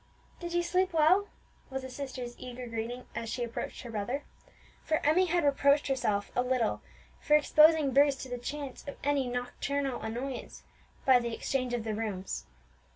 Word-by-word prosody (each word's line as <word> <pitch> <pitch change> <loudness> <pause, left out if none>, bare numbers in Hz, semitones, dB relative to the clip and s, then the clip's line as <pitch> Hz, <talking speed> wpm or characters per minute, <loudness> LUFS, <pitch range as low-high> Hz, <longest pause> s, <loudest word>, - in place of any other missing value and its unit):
"Did 345 -1 -5
you 345 0 +2
sleep 365 +2 +1
well?" 340 +6 +4 0.4
was 265 -1 -4
the 260 - -6
sister's 255 -3 -5
eager 250 0 -7
greeting 235 +2 -4
as 230 -1 -4
she 245 - -2
approached 235 -1 -5
her 240 - -7
brother; 235 +7 -2 0.6
for 315 - +1
Emmie 355 +5 +4
had 345 -1 +2
reproached 280 0 +4
herself 215 -7 0
a 245 - +3
little 250 -3 0 0.4
for 300 - +4
exposing 305 -1 +5
Bruce 280 0 +5
to - - -7
the 245 -1 -4
chance 280 +1 -5
of 280 - -6
any 280 -2 +1
nocturnal 250 +2 -2
annoyance 245 +4 -5 0.4
by 260 -2 +7
the 235 -1 -3
exchange 255 -2 -1
of 235 - -3
the 220 -1 -2
rooms. 210 -3 -4
260 Hz, 170 wpm, -30 LUFS, 240-290 Hz, 0.6 s, by